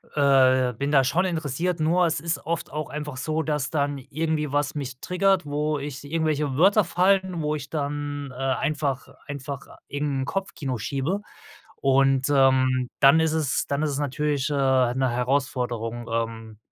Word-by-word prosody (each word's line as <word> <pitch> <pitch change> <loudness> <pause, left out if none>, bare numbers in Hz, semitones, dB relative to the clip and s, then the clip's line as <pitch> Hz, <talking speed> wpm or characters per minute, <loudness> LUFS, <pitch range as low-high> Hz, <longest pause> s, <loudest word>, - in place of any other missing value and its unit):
äh, 130 -3 +4
bin 140 +5 -3
da 135 -2 +5
schon 175 +9 +1
interessiert, 165 0 -2
nur 175 +3 +3
es 160 -2 0
ist 165 -3 -1
oft 170 +1 -3
auch 155 0 -4
einfach 150 -3 -5
so, 155 +3 -1
dass 150 -3 -1
dann 145 -2 -1
irgendwie 150 +1 -2
was 145 0 +1
mich 130 -4 -6
triggert, 185 -1 +2
wo 150 +1 -1
ich 140 0 -6
irgendwelche 150 -3 -1
Wörter 195 +5 +5
fallen, 185 -1 +2
wo 150 0 0
ich 145 0 -7
dann, 145 -2 -3
äh, - - -13
einfach 135 +1 -1 0.2
einfach 140 -1 -6 0.2
irgend 145 -2 -2
'n - - -2
Kopfkino 145 -9 -3
schiebe 140 - -2 0.6
und, 135 0 +3
ähm, 130 -2 +3
dann 140 +4 +7
ist 160 -1 +2
es 155 -4 0
dann 140 +2 -1
ist 150 - +1
es 140 0 -2
natürlich, 145 0 -1
äh, - - -1
'ne 130 -2 +2
Herausforderung, 125 -2 -1
ähm 115 -1 -3
145 Hz, 165 wpm, -25 LUFS, 130-155 Hz, 0.6 s, dann